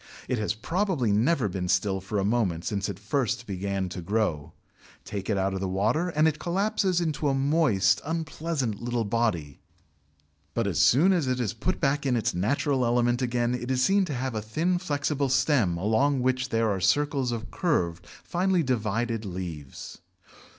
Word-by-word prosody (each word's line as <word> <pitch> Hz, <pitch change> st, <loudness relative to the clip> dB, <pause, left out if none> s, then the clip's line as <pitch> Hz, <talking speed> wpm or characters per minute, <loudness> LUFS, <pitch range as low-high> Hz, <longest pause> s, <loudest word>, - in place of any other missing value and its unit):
It 125 Hz, -, -1 dB
has 105 Hz, 0 st, -1 dB
probably 165 Hz, -, 0 dB
never 120 Hz, +4 st, +2 dB
been 90 Hz, -1 st, -3 dB
still 95 Hz, +1 st, +1 dB
for 105 Hz, +3 st, -4 dB
a 100 Hz, -, +1 dB
moment 100 Hz, -7 st, 0 dB
since 100 Hz, -2 st, -2 dB
it 100 Hz, -, -5 dB
first 120 Hz, +2 st, -1 dB
began 95 Hz, -1 st, -2 dB
to 90 Hz, -, -6 dB
grow. 90 Hz, -6 st, -1 dB, 0.5 s
Take 100 Hz, 0 st, -5 dB
it 105 Hz, -, +1 dB
out 95 Hz, 0 st, 0 dB
of 95 Hz, -, -2 dB
the 95 Hz, -, -2 dB
water, 110 Hz, -, +1 dB
and 155 Hz, -1 st, +3 dB
it 155 Hz, -1 st, -1 dB
collapses 190 Hz, +1 st, 0 dB
into 155 Hz, -3 st, -1 dB
a 135 Hz, -, +1 dB
moist, 135 Hz, -, +2 dB
unpleasant 155 Hz, -7 st, -3 dB
little 120 Hz, -1 st, -1 dB
body, 100 Hz, -10 st, -1 dB, 1.0 s
but -, -, +1 dB
as -, -, -1 dB
soon 170 Hz, +10 st, +5 dB
as 165 Hz, -7 st, 0 dB
it 125 Hz, 0 st, 0 dB
is 115 Hz, -5 st, -1 dB
put 170 Hz, +11 st, -2 dB, 0.2 s
in 130 Hz, -3 st, +1 dB
its 115 Hz, -, 0 dB
natural 130 Hz, -, 0 dB
element 120 Hz, +1 st, +2 dB
again 120 Hz, -1 st, 0 dB
it 125 Hz, 0 st, -4 dB
is 130 Hz, -1 st, +2 dB
seen 195 Hz, 0 st, +3 dB
to 150 Hz, -6 st, -4 dB
have 130 Hz, 0 st, -2 dB
a 110 Hz, -, -2 dB
thin 165 Hz, +12 st, 0 dB
flexible 145 Hz, -4 st, -1 dB
stem 130 Hz, -, +2 dB
along 125 Hz, +9 st, +2 dB
which 130 Hz, 0 st, 0 dB
there 115 Hz, -1 st, +1 dB
are 95 Hz, -2 st, -2 dB
circles 135 Hz, -, +1 dB
of 115 Hz, -1 st, -5 dB
curved, 90 Hz, -, -1 dB, 0.2 s
finely 180 Hz, 0 st, +1 dB
divided 115 Hz, -2 st, -1 dB
leaves. 85 Hz, -8 st, -7 dB
120 Hz, 180 wpm, -27 LUFS, 100-145 Hz, 1.0 s, soon